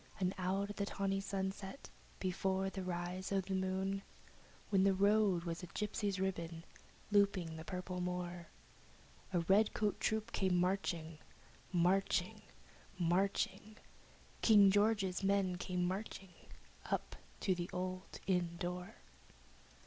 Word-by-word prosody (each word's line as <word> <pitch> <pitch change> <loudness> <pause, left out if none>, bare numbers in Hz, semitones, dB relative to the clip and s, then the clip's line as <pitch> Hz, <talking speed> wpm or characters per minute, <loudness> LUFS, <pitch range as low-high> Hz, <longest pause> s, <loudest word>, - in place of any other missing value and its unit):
And 185 0 +1
out 195 +2 0
of 205 - -9
the 200 - 0
tawny 195 -1 0
sunset, 195 +4 -4 0.3
before 190 +1 0
the 195 - -4
rise 180 +1 -3
of 195 -2 +1
the 195 - -3
moon, 190 +1 0 0.7
When 195 -2 +5
the 195 -1 +4
road 200 -2 +4
was 170 0 -3
a 180 - -7
gypsy's 205 0 -2
ribbon 170 -3 -2 0.5
over 200 -1 +7
the 160 -2 -5
purple 180 0 -4
moor, 180 -1 -3 0.8
The 175 -2 +2
redcoat 205 +3 +3
troops 220 +1 0
came 190 -2 +1
marching 175 -3 0 0.5
Marching 185 +2 +2 0.6
marching 195 +4 0 0.6
King 205 -3 +7
George's 205 -2 +2
men 195 -2 +2
came 180 0 -1
marching, 190 0 -4 0.6
up - - -2 0.3
to 190 - +3
the 175 -1 -3
old 185 +1 -4
inn 175 -3 +1
door. 180 +4 -4
190 Hz, 125 wpm, -37 LUFS, 180-195 Hz, 0.8 s, over